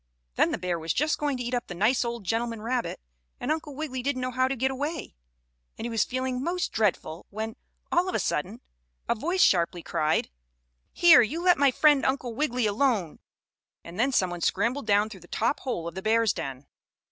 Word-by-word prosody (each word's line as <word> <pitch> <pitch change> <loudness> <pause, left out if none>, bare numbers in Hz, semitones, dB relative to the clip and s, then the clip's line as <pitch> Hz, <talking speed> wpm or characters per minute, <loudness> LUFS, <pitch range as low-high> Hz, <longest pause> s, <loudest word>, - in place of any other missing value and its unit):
Then - - +3
the - - -1
bear 175 -1 -2
was 160 0 -1
just 305 +2 +1
going 290 -3 0
to 245 - -4
eat 240 +1 -4
up 245 -1 -1
the 175 - -7
nice 220 +8 +2
old 235 -2 -4
gentleman 230 +3 -1
rabbit, 245 +1 -2 0.4
and - - -2
Uncle 310 -3 -3
Wiggily 270 -4 -4
didn't 255 -1 -1
know 255 - -2
how 255 +1 +2
to 270 - -1
get 265 +2 0
away, 290 +3 -4 0.6
and - - -5
he 235 - -3
was 225 -2 +2
feeling 255 0 -3
most 360 +2 -1
dreadful, 190 -6 -1
when, 220 +2 -5 0.4
all 355 +2 +2
of - - -3
a - - +2
sudden, 190 +10 -2 0.5
a - - +3
voice 340 +11 +1
sharply 170 -1 +2
cried: 155 - 0 0.6
"Here, 340 -7 +7
you 305 +10 -2
let 360 -4 +4
my 280 -1 +5
friend 290 +1 +4
Uncle 265 -3 -1
Wiggily 250 -2 0
alone," 210 - 0 0.6
and 170 +4 -10
then 260 +4 +2
some 185 -8 +2
one 175 -1 -6
scrambled 230 +9 0
down 205 0 +3
through 205 -3 -10
the 175 - -16
top 285 - 0
hole 175 -11 -3
of 170 - -6
the 190 - -6
bear's 225 +1 +2
den. 135 0 -6
240 Hz, 210 wpm, -27 LUFS, 200-275 Hz, 0.6 s, Here